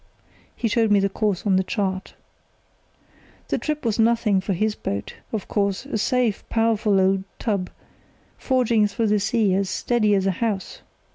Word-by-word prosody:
(He 235 Hz, -, -1 dB
showed 225 Hz, 0 st, +2 dB
me 205 Hz, -1 st, +5 dB
the 195 Hz, 0 st, +1 dB
course 205 Hz, -2 st, -1 dB
on 195 Hz, -2 st, +3 dB
the 190 Hz, -, +2 dB
chart.) 190 Hz, -1 st, -3 dB, 1.3 s
"The -, -, 0 dB
trip 300 Hz, -3 st, -3 dB
was 225 Hz, -1 st, 0 dB
nothing 225 Hz, -4 st, +3 dB
for 195 Hz, +1 st, -2 dB
his 215 Hz, +4 st, 0 dB
boat, 100 Hz, -, -4 dB, 0.2 s
of 215 Hz, -3 st, -4 dB
course, 200 Hz, +2 st, -1 dB
a 275 Hz, -6 st, -3 dB
safe, 245 Hz, -2 st, +1 dB
powerful 225 Hz, -3 st, +2 dB
old 190 Hz, 0 st, +2 dB
tub, 200 Hz, -5 st, -2 dB, 0.7 s
forging 235 Hz, -5 st, +2 dB
through 220 Hz, +1 st, -1 dB
the 210 Hz, 0 st, +3 dB
sea 215 Hz, -1 st, +1 dB
as 195 Hz, 0 st, 0 dB
steady 215 Hz, -1 st, +1 dB
as 195 Hz, -1 st, +1 dB
a 195 Hz, -, +3 dB
house. 200 Hz, 0 st, -3 dB
210 Hz, 165 wpm, -23 LUFS, 195-230 Hz, 1.3 s, me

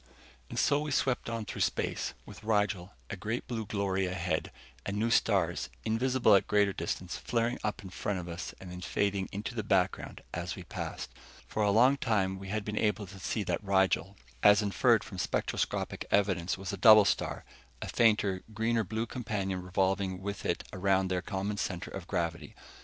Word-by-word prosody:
And -, -, -6 dB
so 145 Hz, +1 st, +3 dB
we 150 Hz, 0 st, -3 dB
swept 130 Hz, -3 st, 0 dB
on 115 Hz, -2 st, -3 dB
through -, -, -5 dB
space, -, -, -1 dB
with -, -, -12 dB
Rigel 105 Hz, -3 st, 0 dB, 0.2 s
a -, -, -2 dB
great 110 Hz, +5 st, -3 dB
blue 115 Hz, -4 st, -3 dB
glory 95 Hz, -2 st, 0 dB
ahead, 90 Hz, -3 st, -2 dB, 0.3 s
and 100 Hz, +1 st, -3 dB
new 115 Hz, +2 st, +1 dB
stars, 95 Hz, -7 st, +2 dB, 0.2 s
invisible 125 Hz, 0 st, +3 dB
at 100 Hz, -, +5 dB
greater 100 Hz, -1 st, +3 dB
distances, 85 Hz, +1 st, -4 dB
flaring 120 Hz, 0 st, 0 dB
up 105 Hz, -1 st, -2 dB
in 95 Hz, -, -9 dB
front 100 Hz, +1 st, -2 dB
of 90 Hz, -1 st, -5 dB
us 85 Hz, 0 st, -5 dB
and 95 Hz, -1 st, -9 dB
then 90 Hz, 0 st, -7 dB
fading 100 Hz, 0 st, 0 dB
into 105 Hz, +4 st, -4 dB
the 115 Hz, -, -2 dB
background 95 Hz, -3 st, 0 dB
as -, -, -3 dB
we -, -, -8 dB
passed. -, -, -5 dB, 0.3 s
For 110 Hz, -, -3 dB
a 105 Hz, -, +3 dB
long 125 Hz, +7 st, +5 dB
time 95 Hz, -6 st, 0 dB
we 95 Hz, -, -8 dB
had 105 Hz, +1 st, -2 dB
been 105 Hz, 0 st, -2 dB
able 105 Hz, -1 st, +1 dB
to 95 Hz, +1 st, -11 dB
see 105 Hz, +3 st, -2 dB
that 90 Hz, +2 st, -2 dB
Rigel, 95 Hz, 0 st, +2 dB, 0.2 s
as 105 Hz, +1 st, +6 dB
inferred 110 Hz, +2 st, +3 dB
from 95 Hz, -, -8 dB
spectroscopic -, -, -1 dB
evidence, 95 Hz, -3 st, +2 dB
was 95 Hz, 0 st, -5 dB
a -, -, -3 dB
double 110 Hz, +1 st, +8 dB
star -, -, -1 dB, 0.3 s
a -, -, -5 dB
fainter, 105 Hz, -5 st, +3 dB
greener 115 Hz, +1 st, +1 dB
blue 110 Hz, +4 st, -2 dB
companion 100 Hz, -6 st, -3 dB
revolving 95 Hz, 0 st, 0 dB
with 100 Hz, 0 st, -4 dB
it -, -, 0 dB
around 95 Hz, 0 st, +2 dB
their 90 Hz, -1 st, 0 dB
common 100 Hz, +3 st, -3 dB
center 90 Hz, -3 st, -3 dB
of 95 Hz, -2 st, -7 dB
gravity. 85 Hz, -3 st, -2 dB
100 Hz, 185 wpm, -31 LUFS, 95-110 Hz, 0.3 s, double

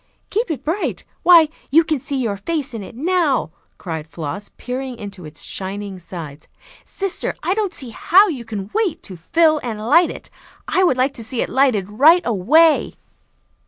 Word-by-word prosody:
"Keep 445 Hz, +4 st, 0 dB
it 285 Hz, -5 st, -4 dB
bright! 340 Hz, +7 st, -2 dB, 0.2 s
Why, 340 Hz, -3 st, +7 dB, 0.2 s
you 325 Hz, +4 st, +5 dB
can 310 Hz, -3 st, -1 dB
see 275 Hz, +2 st, -3 dB
your 225 Hz, -5 st, -1 dB
face 285 Hz, +5 st, -3 dB
in 225 Hz, -, -5 dB
it 200 Hz, -, -10 dB
now," 305 Hz, -, +1 dB, 0.3 s
cried 160 Hz, -3 st, -6 dB
Floss, 165 Hz, +5 st, -6 dB
peering 255 Hz, 0 st, -5 dB
into 200 Hz, -5 st, -9 dB
its 150 Hz, 0 st, -10 dB
shining 195 Hz, 0 st, -6 dB
sides. 165 Hz, -4 st, -9 dB, 0.4 s
"Sister, 390 Hz, -2 st, -4 dB
I 365 Hz, -, +1 dB
don't 410 Hz, -2 st, -1 dB
see 255 Hz, -9 st, -7 dB
how 385 Hz, -, +5 dB
you 275 Hz, -10 st, -4 dB
can 210 Hz, -3 st, -6 dB
wait 385 Hz, -8 st, -1 dB
to 190 Hz, -, -9 dB
'fill 310 Hz, -, +2 dB
and 225 Hz, -4 st, -5 dB
light 300 Hz, +11 st, +4 dB
it.' -, -, -9 dB, 0.4 s
I 375 Hz, -, +2 dB
would 300 Hz, -8 st, +3 dB
like 260 Hz, +2 st, +1 dB
to 230 Hz, -, -7 dB
see 230 Hz, +2 st, -3 dB
it -, -, -6 dB
lighted 250 Hz, -8 st, +2 dB
right 310 Hz, -, +5 dB
away." 285 Hz, -, +3 dB
255 Hz, 180 wpm, -20 LUFS, 200-325 Hz, 0.4 s, Why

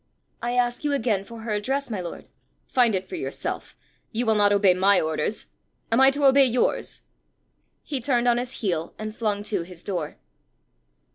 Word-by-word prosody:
"I 240 Hz, 0 st, -2 dB
ask 245 Hz, +1 st, 0 dB
you 295 Hz, -1 st, 0 dB
again 225 Hz, -8 st, 0 dB
for 230 Hz, +1 st, -10 dB
her 220 Hz, -1 st, -3 dB
address, 265 Hz, +6 st, -2 dB
my 200 Hz, -4 st, -2 dB
lord." 175 Hz, -, -7 dB, 0.4 s
"Find 240 Hz, -5 st, +3 dB
it 185 Hz, -, -3 dB
for -, -, -6 dB
yourself. 355 Hz, -, -5 dB, 0.3 s
You 240 Hz, +2 st, -1 dB
will 220 Hz, -, +4 dB
not 205 Hz, -1 st, +4 dB
obey 200 Hz, -2 st, +5 dB
my 195 Hz, +2 st, +5 dB
orders: 160 Hz, +6 st, -2 dB, 0.5 s
am 230 Hz, +3 st, +4 dB
I 265 Hz, -, +8 dB
to 285 Hz, +1 st, 0 dB
obey 275 Hz, 0 st, +7 dB
yours?" 250 Hz, -1 st, 0 dB, 0.8 s
He 280 Hz, -3 st, -3 dB
turned 245 Hz, -1 st, +1 dB
on 240 Hz, 0 st, +3 dB
his 250 Hz, +1 st, -6 dB
heel, 170 Hz, -6 st, -2 dB
and 215 Hz, 0 st, -6 dB
flung 210 Hz, -3 st, -1 dB
to 205 Hz, -3 st, -1 dB
his 175 Hz, 0 st, -11 dB
door. 175 Hz, -6 st, -4 dB
225 Hz, 185 wpm, -24 LUFS, 200-250 Hz, 0.8 s, I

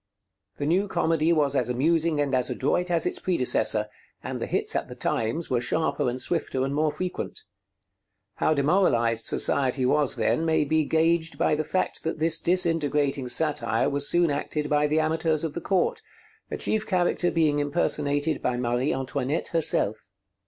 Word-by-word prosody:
The 145 Hz, -, -3 dB
new 185 Hz, +7 st, +1 dB
comedy 165 Hz, -3 st, +1 dB
was 145 Hz, -4 st, +1 dB
as 135 Hz, -, 0 dB
amusing 155 Hz, +5 st, +1 dB
and 140 Hz, -2 st, 0 dB
as 125 Hz, -1 st, +1 dB
adroit 180 Hz, +7 st, -1 dB
as 170 Hz, -2 st, +1 dB
its -, -, -2 dB
predecessor, 125 Hz, -, +1 dB, 0.4 s
and -, -, -5 dB
the -, -, -2 dB
hits -, -, -1 dB
at -, -, -1 dB
the -, -, -9 dB
times 115 Hz, +8 st, -2 dB
were 120 Hz, -2 st, +1 dB
sharper 150 Hz, -1 st, 0 dB
and 125 Hz, +1 st, -4 dB
swifter 135 Hz, -4 st, -1 dB
and 135 Hz, -, -3 dB
more 155 Hz, +1 st, +1 dB
frequent. 185 Hz, -, -5 dB, 0.9 s
How 155 Hz, -, +2 dB
demoralized 135 Hz, -, +2 dB
society 130 Hz, -1 st, +2 dB
was 145 Hz, +1 st, +2 dB
then 160 Hz, -, 0 dB
may 160 Hz, -2 st, +2 dB
be 155 Hz, +1 st, +1 dB
gauged 165 Hz, +1 st, +1 dB
by -, -, +1 dB
the 155 Hz, +1 st, 0 dB
fact 185 Hz, +4 st, -2 dB
that 160 Hz, -, -3 dB
this 160 Hz, +1 st, +2 dB
disintegrating 150 Hz, -6 st, 0 dB
satire 150 Hz, +4 st, +1 dB
was 140 Hz, 0 st, +1 dB
soon 175 Hz, -2 st, +3 dB
acted 150 Hz, +1 st, -3 dB
by 150 Hz, 0 st, +3 dB
the 155 Hz, +1 st, +1 dB
amateurs 160 Hz, 0 st, 0 dB
of 160 Hz, -3 st, -3 dB
the 170 Hz, -, -5 dB
court, 445 Hz, -, 0 dB, 0.5 s
a -, -, -4 dB
chief 220 Hz, 0 st, -1 dB
character 175 Hz, -1 st, +1 dB
being 155 Hz, -4 st, +1 dB
impersonated 145 Hz, 0 st, 0 dB
by 125 Hz, -1 st, -1 dB
Marie 125 Hz, +3 st, 0 dB
Antoinette 135 Hz, +3 st, -2 dB
herself. 110 Hz, -11 st, -1 dB
150 Hz, 170 wpm, -25 LUFS, 140-165 Hz, 0.9 s, soon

